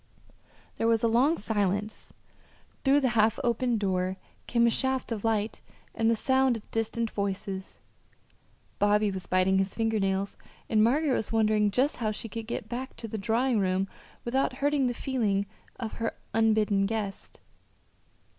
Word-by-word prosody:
There 225 - +2
was 230 -1 +2
a - - +5
long 260 +9 +3
silence. 205 0 -2 0.7
Through 280 +1 +4
the 260 - +2
half 220 -1 +3
open 240 0 +1
door 185 -2 -1 0.3
came 235 -1 +3
a 235 - +4
shaft 265 0 0
of 215 -3 -3
light 220 -1 0 0.3
and 225 0 +1
the 230 - +3
sound 260 +1 +2
of 215 - -15
distant 225 0 -1
voices. 195 -1 -4 1.0
Bobby 205 0 +3
was 190 -2 -6
biting 185 +1 +3
his 195 0 -1
finger 225 -1 +1
nails, 195 0 -1 0.3
and 215 -1 +3
Margaret 280 +5 +3
was 220 - -1
wondering 215 -2 +3
just 260 +8 +1
how 225 -3 -1
she 215 +2 -5
could 225 +1 -6
get 235 - -4
back 255 +2 -5
to 225 - -7
the 220 0 -5
drawing 230 +3 +1
room 190 0 +1 0.4
without 260 +2 +1
hurting 280 0 +1
the 245 - -2
feelings 215 -8 0 0.3
of 225 -3 -4
her 230 - -1 0.2
unbidden 215 -3 +3
guest. 205 -2 -5
225 Hz, 160 wpm, -28 LUFS, 205-240 Hz, 1.0 s, a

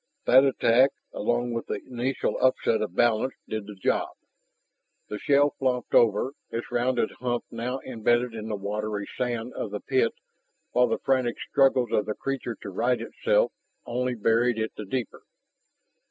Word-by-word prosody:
That 130 +2 +7
attack 130 -1 +4 0.2
along 120 +2 0
with 115 - -4
the - - -2
initial 130 +1 -2
upset 130 -3 +2
of 105 -4 -3
balance 120 +2 +2
did 110 -2 -4
the 105 - -8
job. 95 - 0 1.0
The 105 - -4
shell 145 +3 +3
flopped 125 -2 -1
over, 115 +4 +4 0.2
its 115 +1 -5
rounded 120 -1 +1
hump 120 -1 -1
now 125 +3 -3
embedded 120 0 +1
in 110 -1 -6
the 110 - -2
watery 105 0 -3
sand 120 -1 -2
of - - -4
the 105 +1 -4
pit 130 -4 +1 0.6
while 125 0 +4
the - - 0
frantic 130 -3 +1
struggles 130 -4 +2
of 105 - +1
the 105 - -2
creature 135 -4 -3
to 100 - -5
right 120 +6 +1
itself - - +1 0.3
only 125 +1 -1
buried 115 +2 +2
it 110 0 -1
the 105 - -6
deeper. 120 +2 -4
120 Hz, 160 wpm, -26 LUFS, 110-130 Hz, 1.0 s, That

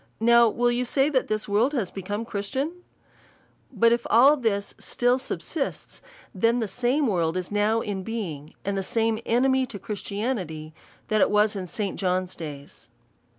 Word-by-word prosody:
Now 235 +1 +6
will 240 +2 +1
you 245 +1 0
say, 270 +3 +2
that 265 -4 +1
this 215 0 -1
world 225 +8 +2
is 210 -8 -1
be 195 - -6
come 205 +4 -4
Christian? 260 +9 -3 1.0
But 230 -1 +3
if 235 0 0
all 265 +6 +7
this 215 -7 -1
still 245 +1 +1
subsists, 265 - -4 0.3
then 230 +5 +2
the 225 -3 -1
.same 250 +8 0
world 175 -6 0
is 180 +1 -4
now 210 +2 +2
in 200 -3 -3
being, 180 -9 -5
and 200 0 -1
the 195 - 0
same 225 +2 +1
enemy 260 +2 +2
to 210 - -6
Christianity, 200 -7 -4 0.4
that 215 -2 +3
was 210 0 +3
in 185 -2 -4
St 200 +2 -3
Johns 185 -1 -1
days. 145 -4 -9
215 Hz, 165 wpm, -25 LUFS, 195-240 Hz, 1.0 s, all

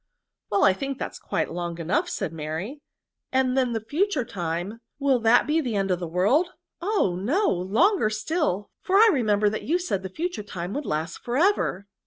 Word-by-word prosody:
" - - -62
Well 200 -1 +3
I 195 - +6
think 275 +6 -4
that - - -4
is - - -11
quite - - -2
long 170 -1 -4
enough," 250 - 0
said 190 - -3
Mary; 165 - -5 0.5
'^and 260 -1 +2
then 255 -3 +1
the 225 -1 -3
future 310 - 0
time, 175 +4 -4 0.2
will 275 -3 +2
that 225 +1 +4
be 305 +1 +1
to - - +3
the 245 -7 -2
end 195 -1 0
of 180 - +1
the 175 - -4
world? 225 - +2 0.2
— - - -57
oh! 365 - +1
no, 315 - +1
longer 215 - +2
still, 215 - -1
for 380 - 0
I 440 +3 +8
remember 210 -6 +2
that 210 +1 -1
you 335 +5 +2
said 355 - -2
the 190 - -6
future 340 - -3
time 185 -2 -6
would 290 0 -4
last 160 +3 -2
for 240 +1 -3
ever 320 - +2
225 Hz, 215 wpm, -25 LUFS, 185-300 Hz, 0.5 s, I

